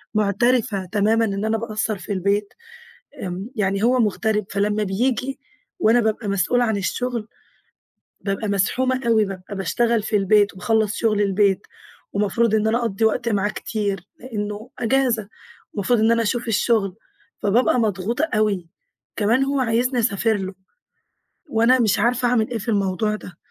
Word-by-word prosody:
مُعترفة 215 0 +1
تمامًا 215 +4 +2
إن 200 0 -2
أنا 220 0 +1
باقصَّر 215 -1 -2
في 205 - -5
البيت. 200 +2 0 0.7
آمم، 185 +5 -5
يعني 195 0 0
هو 250 +1 +3
مُغترب 210 -1 +1
فلمّا 205 +1 0
بييجي 250 +7 -1 0.4
وأنا 230 -1 +4
بابقى 220 -1 -1
مسؤولة 200 +6 +2
عن 220 -2 0
الشغل 235 +3 -2 0.9
بابقى 200 +1 -2
مزحومة 255 +7 +1
أوي، 220 -2 +4
بابقى 195 0 -7
باشتغل 230 +4 +1
في 215 - 0
البيت 205 0 +3
وباخلّص 220 +2 0
شُغل 215 -3 +1
البيت 200 -1 +2 0.5
ومفروض 210 +2 +1
إن 215 0 +2
أنا 230 +2 +2
أقضّي 225 -2 -1
وقت 225 +2 +1
معاه 205 -1 +1
كتير؛ 205 -3 -3 0.2
لأنه 210 -3 -5
أجازة 235 -3 +1 0.5
ومفروض 215 +3 +1
إن 225 +1 +4
أنا 230 0 +2
أشوف 240 +2 -1
الشغل 210 -3 +1 0.4
فبابقى 240 +4 +2
مضغوطة 220 - 0
أوي. 200 -5 0 0.5
كمان 230 +5 +2
هو 275 0 0
عايزني 245 +1 +1
أسافر 220 0 +1
له، 190 -1 -5 1.0
وأنا 230 +3 +4
مش 215 -4 +2
عارفة 245 +2 +2
أعمل 225 -3 +1
إيه 235 - -1
في 210 - -5
الموضوع 200 +1 0
ده. 180 -5 -11
215 Hz, 150 wpm, -22 LUFS, 200-235 Hz, 1.0 s, وأنا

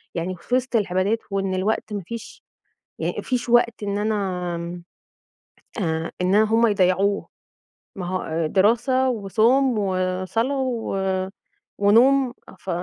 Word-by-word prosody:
يعني 180 +2 -2
في 245 +8 -2
وسط 255 -1 -1
العبادات، 200 +1 +1
وإن 195 -1 -1
الوقت 210 +3 -1
ما 200 - -2
فيش 230 +6 -9 0.6
ي - - -1
ما - - -3
فيش 250 -2 -2
وقت 235 -2 +3
إن 200 0 -1
أنا 180 -5 -2 1.0
آآ، 160 -1 -1
إن 185 +2 +2
هم 225 +2 +4
يضيعوه، 195 0 +2 0.7
ما 185 - -5
هو 165 -3 -2
دراسة، 240 - +2
وصوم، 230 +3 +2
وصلاة، 185 +7 -1
و 240 -6 -2 0.8
ونوم، 245 +5 +4 0.3
ف - - -10
205 Hz, 120 wpm, -23 LUFS, 185-235 Hz, 1.0 s, هم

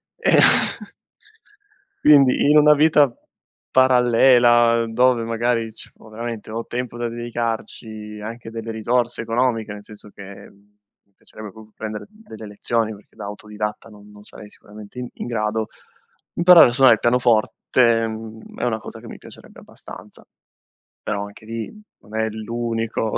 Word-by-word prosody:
eh - - 0 1.7
Quindi 140 -2 +5
in 150 - +5
una 150 0 +7
vita 150 -1 +4 0.6
parallela, 120 -2 +4
dove 125 +1 +2
magari 115 0 -1
ci 110 - -9
ho 110 - -16
veramente 115 0 -7
ho 115 +1 -5
tempo 120 -1 -5
da 120 0 -2
dedicarci, 115 -2 -5
anche 115 +2 -8
delle 115 0 -6
risorse 120 +2 -1
economiche 115 -1 -1
nel 105 0 -10
senso 105 0 -10
che, 100 - -15
mhmm, 100 +1 -14 0.3
mi 100 - -42
piacerebbe 110 -2 -12
proprio 110 +1 -16
prendere 110 -1 -6
delle 210 - -13
lezioni 110 +2 -2
perché 105 0 -18
da 110 - -9
autodidatta 105 +1 -6
non 105 -1 -16
non 105 0 -16
sarei 105 - -12
sicuramente 105 +3 -13
in 125 - -5
in - - -7
grado, 110 -1 -2 0.7
imparare 175 0 +7
a - - -1
suonare 130 -2 +6
il - - -13
pianoforte, 120 -1 +2
mhmm, 110 0 -9
è - - -1
una 110 -2 -1
cosa - - -10
che - - -13
mi - - -10
piacerebbe - - -15
abbastanza, - - -14 0.8
però 100 -1 -3
anche 100 +1 -13
lì 115 0 -6 0.3
non 105 +1 -10
è 110 - 0
l'unico 115 0 -3
115 Hz, 150 wpm, -21 LUFS, 110-120 Hz, 1.7 s, una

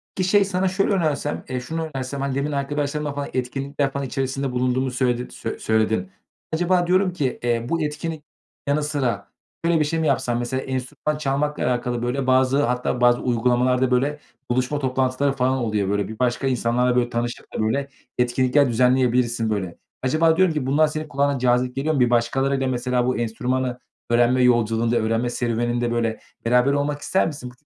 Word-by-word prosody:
Peki, 185 -1 0
şey, 205 0 +5
sana 190 -1 0
şöyle 195 +2 +1
önersem, 155 -5 -1
eee, 130 - -2
şunu 160 +5 -4
önersem: 135 +1 -4
Hani, 135 -1 -1
demin 140 +2 -1
arkadaşlarından 145 +1 -2
falan, 145 0 -4
etkinlikler 135 +2 -2
falan 140 0 -3
içerisinde 135 +1 -2
bulunduğunu 125 +1 0
söyledin 125 -1 0
söyle - - -6
söyledin. 110 -4 0 0.4
Acaba 175 +1 +2
diyorum 185 0 +2
ki, 140 -8 -2
eee, 120 -1 0
bu 165 -1 0
etkinlik 150 +1 -3 0.4
yanı 150 +1 +1
sıra 130 -9 -1 0.4
şöyle 170 -1 +3
bir 150 - +2
şey 165 +2 -1
mi 160 - +1
yapsan? 120 -4 +1
Mesela 130 +2 -2
enstrüman 135 +3 -3
çalmakla 150 +1 -1
alakalı, 120 -1 -1
böyle, 125 +2 -1
bazı 130 +2 +3
hatta 125 -1 -1
bazı 120 0 +4
uygulamalarda, 125 +1 +2
böyle, 140 +4 +1 0.3
buluşma 130 +4 0
toplantıları 130 +1 0
falan 130 -1 +1
oluyor. 105 -5 -1
Böyle, 100 -1 0
bir 110 +1 -9
başka 125 +1 0
insanlarla, 125 0 +1
böyle, 120 -1 +2
tanışıp 120 0 -4
da, - - -4
böyle, 135 +6 0 0.3
etkinlikler 130 +3 +3
düzenleyebilirsin, 125 -1 +2
böyle. 95 -5 -3 0.3
Acaba 160 +5 +3
diyorum 185 -3 +4
ki, 150 -4 -2
bunlar 150 +4 +3
senin 155 +1 -4
kulağına 140 -1 0
cazip 125 0 +1
geliyor 155 +4 0
mu? 140 - 0
Bir 125 - +4
başkalarıyla 135 +3 +1
mesela 125 -1 0
bu 125 - 0
enstrümanı 125 +2 -2 0.3
öğrenme 120 +2 +3
yolculuğunda, 115 -1 +2
öğrenme 115 +2 0
serüveninde, 120 0 -1
böyle, 115 -1 -1 0.3
beraber 125 +4 +3
olmak 145 +1 -1
ister 190 - +1
misin? 140 -6 -6
130 Hz, 175 wpm, -23 LUFS, 120-145 Hz, 0.4 s, şey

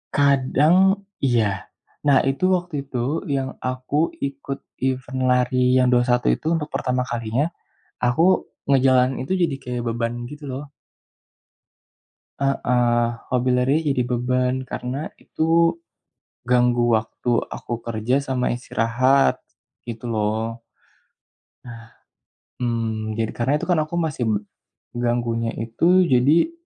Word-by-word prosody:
Kadang, 140 +3 +3 0.5
iya, 110 -7 0 0.4
nah 140 -2 +6
itu 135 +7 -1
waktu 175 -2 -4
itu 135 -2 -6 0.4
yang 135 -1 -1
aku 130 +2 -3 0.3
ikut 140 0 -7 0.2
event 130 0 -2
lari 125 0 +3
yang 125 - +4
21 125 0 +2
itu 160 - -3
untuk 150 -2 -2
pertama 125 -1 0
kalinya. 120 +6 -1 0.5
Aku 125 +7 +2 0.5
ngejalanin 130 -1 +4
itu - - 0
jadi 150 -5 0
kayak 125 -1 -4
beban 115 0 -1 0.2
gitu 150 0 -10
loh. 135 +3 -5 1.8
Heeh, 120 -3 +2 0.3
hobi 125 0 +1
lari 130 +3 +2
jadi 135 -3 +1
beban 125 +1 0
karena 130 +5 -4
itu, 165 +1 +2 0.7
ganggu 120 -1 +3
waktu 110 +2 -3 0.2
aku - - -7
kerja 115 +2 -1
sama 130 -1 -1
istirahat, 125 +3 +2 0.5
gitu 115 +1 -7
loh. 110 +2 -1 2.0
Mmm, 110 -3 -2
jadi 115 -1 -1
karena 125 +4 +1
itu - - -5
kan 170 -3 +3
aku 155 +3 -2
masih 155 -7 -1
m - - +2 0.6
ganggunya 120 -1 -1
itu 170 +12 +3
jadi, 150 - +4
125 Hz, 115 wpm, -22 LUFS, 120-140 Hz, 2.0 s, nah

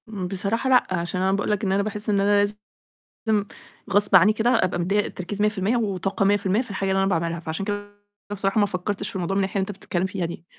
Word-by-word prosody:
امم 195 -4 -4
بصراحة 200 +7 -1
لأ، 255 -1 +5
عشان 175 +1 -2
أنا 190 0 +2
باقُول 200 +2 0
لك 210 0 -1
إن 190 - 0
أنا 200 +1 +2
باحس 210 0 -3
إن 200 -1 +2
أنا 205 +1 +3
لازم، 205 +1 0 1.3
غصب 205 0 +4
عنّي 185 +4 +7
كده 220 +2 +1
أبقى 205 -7 +2
مدّية 190 +4 +1
التركيز 190 +3 -5
100% 210 +2 +1
وطاقة 195 -3 -1
100% 200 +1 +2
في 250 - -9
الحاجة 195 -1 -2
اللي 190 0 +2
أنا 195 - +1
باعملها، 170 -2 -1
فعشان 165 +3 -4
كده 205 0 -5 0.3
بصراحة 195 +1 0
ما 205 - +5
فكّرتش 195 +1 -3
في 230 - -11
الموضوع 185 +1 -2
من - - +2
الناحية 195 +1 -2
اللي 190 - -1
أنت - - -1
بتتكلم 180 -1 -2
فيها 190 -2 -3
دي. 170 0 -7
195 Hz, 230 wpm, -24 LUFS, 185-205 Hz, 1.3 s, عنّي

